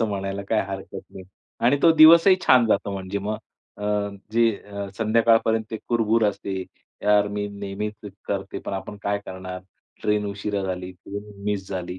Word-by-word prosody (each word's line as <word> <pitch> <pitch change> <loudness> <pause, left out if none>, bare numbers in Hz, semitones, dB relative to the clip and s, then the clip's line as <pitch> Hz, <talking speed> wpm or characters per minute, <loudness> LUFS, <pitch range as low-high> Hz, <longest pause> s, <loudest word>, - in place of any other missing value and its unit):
असं 115 - +1
म्हणायला 100 -1 -3
काही 110 - +2
हरकत 95 0 -6
नाही 95 - -10 0.4
आणि 135 +4 +5
तो 165 - +7
दिवसही 165 +4 +8
छान 125 -3 +6
जातो 100 -2 +1
म्हणजे 95 +1 -4
मग. 105 +2 -3 0.4
अ, 105 - -7 0.5
जे 115 0 +4
अ, 100 -1 -7
संध्याकाळपर्यंत 115 0 +3
ते 110 - -3
कुरबूर 115 -1 +2
असते, 100 -2 -2 0.4
"यार, 105 0 +4
मी 105 0 -3
नेहमीच 100 +1 -5 0.3
करते, 100 -1 -3
पण - - -7
आपण 95 +1 -5
काय 100 0 0
करणार, 95 0 -7 0.4
ट्रेन 105 0 +1
उशिरा 100 0 -3
झाली 90 -1 -4
किंवा 100 +3 -9
मिस 100 -2 -2
झाली," 90 -1 -5
100 Hz, 165 wpm, -24 LUFS, 95-110 Hz, 0.5 s, दिवसही